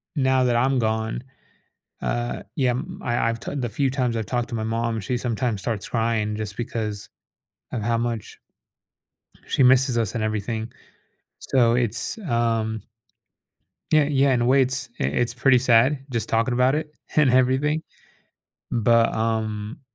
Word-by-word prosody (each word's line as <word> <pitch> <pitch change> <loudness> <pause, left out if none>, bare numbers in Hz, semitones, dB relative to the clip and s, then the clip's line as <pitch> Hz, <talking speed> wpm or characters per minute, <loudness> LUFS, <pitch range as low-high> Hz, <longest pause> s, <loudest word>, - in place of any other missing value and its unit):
now 130 -2 +3
that 120 -1 +2
I'm 130 +2 +2
gone, 110 +2 -1 0.8
uh 120 0 -2
yeah, 130 -4 +2
m 175 +9 -5
I 120 -1 0
I've 115 -1 -5
t - - -6
the 125 -4 -2
few 135 +3 0
times 125 -4 -1
I've 110 -3 -2
talked 120 0 -2
to - - -4
my 110 - -2
mom, 115 0 -1
she 125 +6 -2
sometimes 120 -3 -1
starts 110 -5 -3
crying 110 -2 0
just 105 -2 -5
because 110 -3 -4 0.7
of 115 - -2
how 115 0 +1
much 115 -3 -3 1.1
she 135 - +2
misses 130 -1 +4
us 115 0 -1
and 110 - -1
everything. 110 +2 -3 0.7
So 120 -3 +2
it's, 115 - -1
um 115 - -1 1.1
Yeah 155 -2 +5
yeah, 140 -1 +2
in 120 - +1
a - - +2
way, 135 +2 +5
it's 130 -1 -1
i - - 0
it's 115 - 0
pretty 130 +1 +4
sad 130 +3 +4
just 115 -3 -2
talking 115 +2 +1
about 125 +3 +3
it 150 0 -4 0.2
and 150 -4 +5
everything. 130 +5 +2 0.9
But, 115 0 +3
um 110 +2 -2
120 Hz, 160 wpm, -23 LUFS, 110-130 Hz, 1.1 s, Yeah